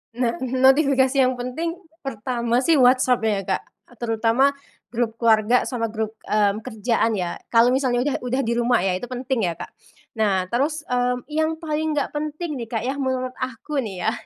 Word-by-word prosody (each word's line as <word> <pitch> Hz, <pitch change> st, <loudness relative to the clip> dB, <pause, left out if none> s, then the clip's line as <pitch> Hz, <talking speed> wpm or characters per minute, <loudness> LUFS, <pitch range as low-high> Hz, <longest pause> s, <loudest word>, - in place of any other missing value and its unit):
Nah, 240 Hz, -2 st, 0 dB
notifikasi 265 Hz, +1 st, +4 dB
yang 255 Hz, -1 st, 0 dB
penting, 330 Hz, +8 st, -3 dB, 0.2 s
pertama 240 Hz, -1 st, -1 dB
sih 320 Hz, +5 st, +3 dB
WhatsApp 255 Hz, -2 st, +4 dB
ya, 210 Hz, -3 st, +1 dB
Kak, -, -, -1 dB, 0.3 s
terutama 230 Hz, +4 st, +2 dB, 0.4 s
grup 230 Hz, -1 st, -1 dB
keluarga 230 Hz, +1 st, +3 dB
sama 230 Hz, -3 st, -2 dB
grup, 220 Hz, 0 st, -3 dB, 0.2 s
mmm, 210 Hz, 0 st, +2 dB
kerjaan 225 Hz, -1 st, 0 dB
ya. 180 Hz, -3 st, -3 dB
Kalau 235 Hz, +1 st, +4 dB
misalnya 255 Hz, -2 st, +1 dB
udah 290 Hz, -, 0 dB
udah 250 Hz, +2 st, -1 dB
di 230 Hz, -, -1 dB
rumah 240 Hz, -5 st, +2 dB
ya, 195 Hz, -, +1 dB
itu 245 Hz, -, -6 dB
penting 250 Hz, -4 st, -1 dB
ya, 170 Hz, -, -2 dB
Kak. -, -, -9 dB, 0.5 s
Nah, 195 Hz, -4 st, +2 dB
terus, 295 Hz, +5 st, 0 dB
mmm, 250 Hz, 0 st, 0 dB
yang 315 Hz, +1 st, 0 dB
paling 315 Hz, -1 st, -2 dB
gak 285 Hz, -, -1 dB
penting 300 Hz, -1 st, -4 dB
nih, 230 Hz, -, -5 dB
Kak, 225 Hz, 0 st, -3 dB
ya, 270 Hz, +3 st, -2 dB
menurut 260 Hz, -1 st, -1 dB
aku 260 Hz, +3 st, -3 dB
nih 195 Hz, -8 st, -4 dB
ya, 220 Hz, -, +2 dB
250 Hz, 175 wpm, -23 LUFS, 225-270 Hz, 0.5 s, notifikasi